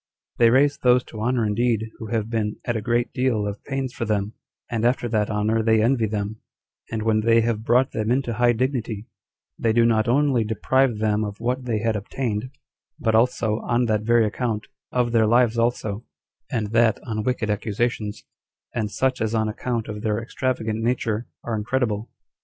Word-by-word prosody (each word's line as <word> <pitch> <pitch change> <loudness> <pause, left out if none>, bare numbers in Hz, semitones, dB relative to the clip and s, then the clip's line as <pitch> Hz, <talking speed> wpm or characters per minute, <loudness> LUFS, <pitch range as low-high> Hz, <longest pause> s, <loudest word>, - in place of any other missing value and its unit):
They 115 -1 +7
raise 140 +4 +3
those 125 0 +4
to 110 - -9
honor 120 0 +1
indeed 110 +1 0
who 110 - -6
have 110 -1 -1
been 110 -2 -1
at 120 - -1
a 110 - -1
great 120 +2 0
deal 125 -5 +1
of 100 0 -6
pains 135 -2 -3
for - - -4
them, 105 -1 -1 0.3
and 115 -2 -2
after 120 0 +2
that 110 -2 0
honor 110 +1 +1
they 110 0 +3
envy 115 -2 +2
them; 105 +1 -3 0.5
and 110 -1 -2
when 110 -1 +2
they 115 +1 +4
have 110 -1 -1
brought 125 +3 +3
them 110 0 -2
into 125 -1 +1
high 120 +1 +3
dignity, 115 -4 -2 0.5
they 115 - +2
do 115 0 +4
not 110 -1 +2
only 130 -1 +3
deprive 120 +3 +1
them 105 0 +1
of 105 -1 -5
what 125 +2 -2
they 110 -3 -1
had 115 -1 0
obtained, 110 +2 -3 0.5
but 110 - +1
also, 110 -1 +2
on 120 +1 +1
that 110 -2 +1
very 115 +1 +3
account, 110 0 -2 0.3
of 125 -1 +1
their 115 -2 +4
lives 120 0 +3
also, 115 -2 -1 0.5
and 105 -3 -1
that 115 -1 +3
on 110 -3 -2
wicked 110 -2 -1
accusations, 105 0 -2 0.5
and 110 -3 -1
such 130 +3 0
as 110 +1 0
on 110 -1 +1
account 115 +1 -3
of 105 -1 -6
their 105 -1 0
extravagant 115 -2 -2
nature, 115 -1 -1 0.2
are 120 - -3
incredible. 110 -1 -1
115 Hz, 185 wpm, -23 LUFS, 110-120 Hz, 0.5 s, They